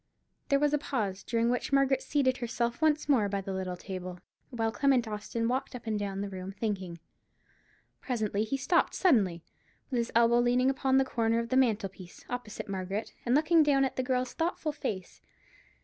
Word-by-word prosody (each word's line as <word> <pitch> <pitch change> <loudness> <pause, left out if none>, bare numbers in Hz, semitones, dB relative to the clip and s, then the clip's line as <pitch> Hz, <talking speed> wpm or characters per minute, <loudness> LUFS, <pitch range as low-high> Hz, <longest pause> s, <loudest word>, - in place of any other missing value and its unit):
There 280 - +4
was 295 +1 +2
a 295 - +3
pause, 210 -10 -2
during 235 0 0
which 245 - -2
Margaret 275 -1 +3
seated 260 -3 +1
herself 235 +1 -2
once 310 -1 +2
more 235 -8 +3
by 200 0 -1
the 195 0 -5
little 185 -1 -3
table, 185 -1 -6 0.3
while 225 -3 -1
Clement 260 -2 +2
Austin 220 +2 -3
walked 255 +2 -2
up 240 - -9
and 215 -2 -1
down 195 -1 -3
the 200 - -3
room 190 0 -6
thinking. 195 -5 -3 1.0
Presently 215 -5 -1
he 245 +5 -2
stopped 335 +6 +1
suddenly, 200 - +2 0.5
with 250 - +1
his 235 - -2
elbow 235 +1 +5
leaning 250 +2 +3
upon 265 0 +1
the 270 - +4
corner 230 -3 +1
of 230 0 -2
the 255 - 0
mantel 225 -6 +3
piece, 185 -2 -14
opposite 220 -3 -5
Margaret, 195 +2 -4
and 245 - +4
looked 305 +3 +2
down 275 -2 +3
at 265 - -3
the - - 0
girl's 255 -1 -1
thoughtful 325 -2 -1
face. 190 -10 -5
235 Hz, 190 wpm, -30 LUFS, 200-265 Hz, 1.0 s, elbow